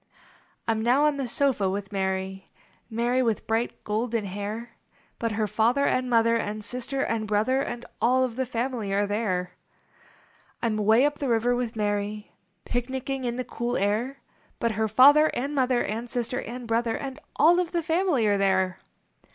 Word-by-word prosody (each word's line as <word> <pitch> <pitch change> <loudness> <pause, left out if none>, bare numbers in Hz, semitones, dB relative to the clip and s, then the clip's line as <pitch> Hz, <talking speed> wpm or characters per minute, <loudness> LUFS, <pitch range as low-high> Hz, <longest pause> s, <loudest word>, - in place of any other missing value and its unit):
I - - +3
m 220 -1 -1
now 250 +6 +3
on 300 -1 +2
the 270 -2 -2
sofa 240 -6 +1
with 195 +1 -4
Mary, 190 -1 -3 0.4
Mary 240 +3 +1
with 230 -4 0
bright, 225 +2 -1
golden 220 +1 -1
hair; 205 +4 -5 0.5
But 230 -1 -1
her 215 +1 0
father 230 +7 +2
and 255 0 +1
mother 230 -1 +4
And 210 -1 -4
sister 255 +2 -3
and 220 -1 -1
brother 220 +6 +2
And 240 -3 -5 0.2
all 255 +2 +4
of 245 -3 -2
the 260 0 -2
family 235 -3 -2
are 205 +1 +2
there. 195 -4 -1 1.1
I - - -3
m 220 -2 +1
way 220 +5 +4
up 290 0 -1
the 275 - -1
river 235 +1 +2
with 245 -2 -3
Mary, 205 0 -2 0.3
Picnicking 260 +2 -3
in 240 -1 -1
the 255 0 -3
cool 240 +1 -2
air; 220 +7 0 0.4
But 235 - 0
her 220 +1 0
father 285 +8 +7
and 275 +4 -2
mother 255 -3 +2
And 230 +3 -4
sister 245 +2 -2
and 245 0 -7
brother 230 0 0
And 275 +1 -6 0.2
all 335 +4 +5
of 355 -2 -1
the 340 -1 -1
family 325 - +1
are 205 -1 +2
there. 190 -1 +1
235 Hz, 180 wpm, -26 LUFS, 210-255 Hz, 1.1 s, father